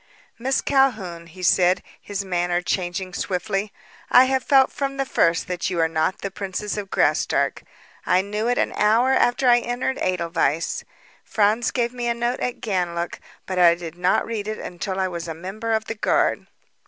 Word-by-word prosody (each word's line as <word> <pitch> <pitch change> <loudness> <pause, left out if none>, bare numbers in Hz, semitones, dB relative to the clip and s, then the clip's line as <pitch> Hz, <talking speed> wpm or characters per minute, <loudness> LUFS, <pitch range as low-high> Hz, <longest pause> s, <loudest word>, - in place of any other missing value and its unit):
"Miss 260 +3 0
Calhoun," 215 -12 +1
he 180 +3 -11
said, 180 +1 +3 0.2
his 200 -1 -4
manner 175 -1 0
changing 185 0 -2
swiftly, 195 +3 -2 0.4
"I 250 - +8
have 265 0 0
felt 270 -2 +4
from 275 -1 -3
the 270 - 0
first 170 -9 +1
that 180 -1 -2
you 175 -2 -2
are 165 - +4
not 160 +3 -1
the 195 - -3
princess 195 +1 -4
of 205 -2 -5
Graustark. - - +1 0.4
I 185 +1 +2
knew 210 +3 -2
it 245 - +1
an - - +1
hour 225 +5 +3
after 250 0 +2
I 240 0 +6
entered 245 +2 -2
Edelweiss. 170 -3 0 0.4
Franz 215 +3 +1
gave 240 -1 -1
me 240 -1 -3
a 235 - +1
note 240 +2 -1
at 250 - -3
Ganlook, 175 -5 -2 0.3
but 185 -1 -2
I 170 -1 +6
did 170 -1 -8
not 180 +1 +1
read 215 -3 -4
it 215 0 -3
until 185 +2 -5
I 190 - +1
was 170 -2 -5
a 165 - -5
member 195 +7 -5
of 220 0 +1
the 225 - -4
guard." 210 - +1
195 Hz, 185 wpm, -23 LUFS, 175-235 Hz, 0.4 s, I